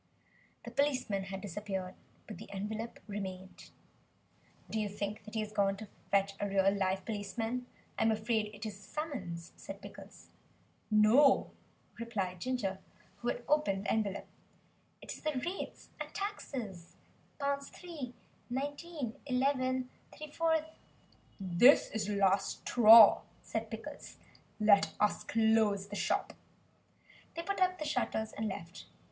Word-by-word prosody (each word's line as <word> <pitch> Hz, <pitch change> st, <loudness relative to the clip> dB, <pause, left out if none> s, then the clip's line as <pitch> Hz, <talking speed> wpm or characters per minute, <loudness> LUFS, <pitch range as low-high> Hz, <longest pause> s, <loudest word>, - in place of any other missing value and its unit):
The -, -, -6 dB
policeman 255 Hz, -9 st, 0 dB
had 195 Hz, 0 st, -6 dB
disappeared. 195 Hz, -1 st, -4 dB, 0.3 s
But 215 Hz, -, -9 dB
the -, -, -10 dB
envelope 215 Hz, +4 st, -4 dB
remained. 190 Hz, -3 st, -7 dB, 1.0 s
"Do 220 Hz, -, -2 dB
you 210 Hz, -1 st, -1 dB
think 205 Hz, +1 st, -4 dB
that 215 Hz, -, -10 dB
he 220 Hz, -, +1 dB
has 215 Hz, 0 st, -5 dB
gone 195 Hz, -1 st, +2 dB
to 215 Hz, +1 st, -8 dB, 0.2 s
fetch 200 Hz, 0 st, +2 dB
a 205 Hz, -, -1 dB
real 195 Hz, 0 st, +4 dB
live 190 Hz, -1 st, 0 dB
policeman? 225 Hz, +4 st, -3 dB, 0.3 s
I -, -, +1 dB
am 225 Hz, -, +4 dB
afraid 220 Hz, 0 st, 0 dB
it 210 Hz, +1 st, -8 dB
is 205 Hz, -2 st, -6 dB
a -, -, -17 dB
summons," 195 Hz, -, -5 dB
said -, -, -8 dB
Pickles. -, -, -12 dB, 0.6 s
"No," 220 Hz, +6 st, +5 dB, 0.5 s
replied 195 Hz, -6 st, -3 dB
Ginger, 220 Hz, -7 st, -1 dB, 0.4 s
who 240 Hz, -, -6 dB
had 240 Hz, -, -1 dB
opened 210 Hz, -10 st, +2 dB
the -, -, +1 dB
envelope, 205 Hz, -3 st, 0 dB, 0.8 s
"it -, -, -5 dB
is -, -, -11 dB
the 305 Hz, 0 st, -1 dB
rates 365 Hz, +3 st, -5 dB
and -, -, -5 dB
taxes, 250 Hz, -, -5 dB, 0.4 s
£3 280 Hz, 0 st, -4 dB, 0.4 s
19 285 Hz, 0 st, -4 dB
11 255 Hz, -1 st, +1 dB, 0.3 s
3/4." 320 Hz, +1 st, 0 dB, 0.7 s
"This 195 Hz, +9 st, +5 dB
is 215 Hz, -2 st, -2 dB
the 210 Hz, -, -1 dB
last 195 Hz, 0 st, +2 dB
straw," 225 Hz, -2 st, +9 dB, 0.2 s
said -, -, -3 dB
Pickles, -, -, -8 dB, 0.4 s
"let 205 Hz, -2 st, +5 dB
us 210 Hz, -, +2 dB
close 220 Hz, -3 st, +2 dB
the 205 Hz, -, -5 dB
shop." -, -, 0 dB, 1.0 s
They 335 Hz, -, -3 dB
put 400 Hz, +2 st, -2 dB
up 370 Hz, 0 st, +3 dB
the 305 Hz, -, -4 dB
shutters, 240 Hz, -6 st, -1 dB
and 220 Hz, +1 st, -2 dB
left. 175 Hz, -3 st, -7 dB
220 Hz, 140 wpm, -33 LUFS, 200-260 Hz, 1.0 s, straw